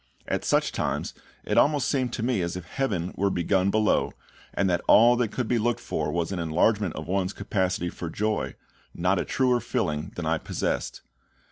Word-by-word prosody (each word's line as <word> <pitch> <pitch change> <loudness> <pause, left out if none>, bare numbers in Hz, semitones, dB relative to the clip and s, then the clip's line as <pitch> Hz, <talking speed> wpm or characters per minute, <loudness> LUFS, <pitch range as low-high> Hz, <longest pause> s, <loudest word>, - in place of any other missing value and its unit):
At - - -1
such - - +2
times - - -2 0.3
it - - +2
almost 145 -2 +3
seemed 130 -4 0
to 115 - -3
me 120 -5 +1
as 85 0 -2
if 90 - -8
heaven 95 -6 -2
were 100 +1 +1
begun 95 +1 +1
below, 110 +1 +2 0.4
and 100 - 0
that 85 -2 +1
all 120 +3 +7
that 120 -2 +1
could 125 -3 -2
be 120 0 +1
looked 120 +2 0
for 75 -1 -2
was 85 +1 -1
an 95 - -2
enlargement 85 +4 +1
of 80 -1 -6
one's 95 0 0
capacity 90 -3 -1
for 85 - -6
joy, 105 +5 -1 0.4
not 90 +2 +1
a - - -1
truer 125 -2 +2
filling 80 -6 -2
than 90 - -4
I 80 0 +1
possessed. - - -3
95 Hz, 195 wpm, -26 LUFS, 85-115 Hz, 0.4 s, all